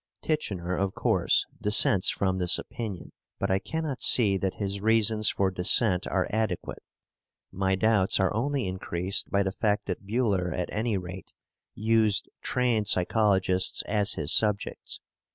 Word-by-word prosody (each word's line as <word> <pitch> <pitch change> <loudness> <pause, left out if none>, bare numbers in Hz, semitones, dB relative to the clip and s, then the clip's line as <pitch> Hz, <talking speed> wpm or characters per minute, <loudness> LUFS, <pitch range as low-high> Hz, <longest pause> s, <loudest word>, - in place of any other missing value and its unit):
"* - - -60
Titchener, 95 - -2
of 100 -1 -2
course, - - +1 0.2
dissents 105 -2 +3
from 95 -1 -1
this 90 0 +2
opinion, 105 -7 -7 0.3
but - - -2
I 95 - +2
cannot 160 +1 -4
see 105 -6 +5
that 95 0 -2
his 100 -1 -4
reasons 110 0 +3
for 95 -1 0
dissent 90 +1 +2
are 95 -1 -1
adequate. 110 -5 -3 0.7
My 95 0 0
doubts 105 -1 +2
are 95 - +1
only 135 +3 -1
increased 95 +1 -3
by 100 0 +1
the 95 - -2
fact 105 +1 -1
that 95 +1 -6
Buhler 100 -6 0
at 90 - -3
any 110 -1 -1
rate 90 +1 -9 0.4
used 110 -1 +1
trained 120 -5 0
psychologists 95 -1 +1
as 105 -1 0
his 75 -1 +2
subjects. 105 -2 0
100 Hz, 150 wpm, -27 LUFS, 95-110 Hz, 0.7 s, see